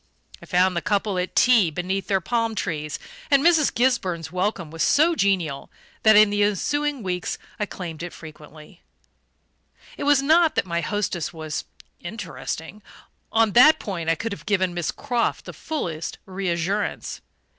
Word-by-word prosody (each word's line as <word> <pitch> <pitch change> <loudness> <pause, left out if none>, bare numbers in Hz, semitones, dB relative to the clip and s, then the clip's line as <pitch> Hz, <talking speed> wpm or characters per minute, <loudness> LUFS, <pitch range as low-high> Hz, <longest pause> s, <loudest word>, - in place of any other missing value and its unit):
I - - -13
found 180 0 +2
the 170 - 0
couple 200 +1 0
at 180 - -3
tea 235 -8 +5
beneath 185 +4 -3
their 195 -2 +2
palm 230 +2 -1
trees; 150 -6 -3 0.3
and 280 -1 +4
Mrs. 325 -4 +4
Gisburn's 185 - 0
welcome 180 -3 -2
was 165 0 -6
so 320 +4 +4
genial 185 - 0 0.3
that, 220 -1 +6
in 210 0 +7
the 205 0 0
ensuing 280 - 0
weeks, 180 -1 -3 0.2
I 210 - -1
claimed 165 -5 -7
it 175 0 -5
frequently. 155 +2 -13 1.2
It - - -4
was 285 -1 +4
not 320 +2 +4
that - - +1
my 170 -1 -2
hostess 190 -5 -2
was 155 -2 -5 0.3
"interesting": 175 -1 -6 0.5
on 225 -1 +3
that 275 +9 +7
point 170 -6 -4
I 165 - +3
could 225 +7 -4
have 200 - -8
given 185 -3 +1
Miss 175 -3 -2
Croft 240 -2 -2
the - - -8
fullest 170 - -4
reassurance. 190 +1 -2
195 Hz, 155 wpm, -23 LUFS, 170-225 Hz, 1.2 s, in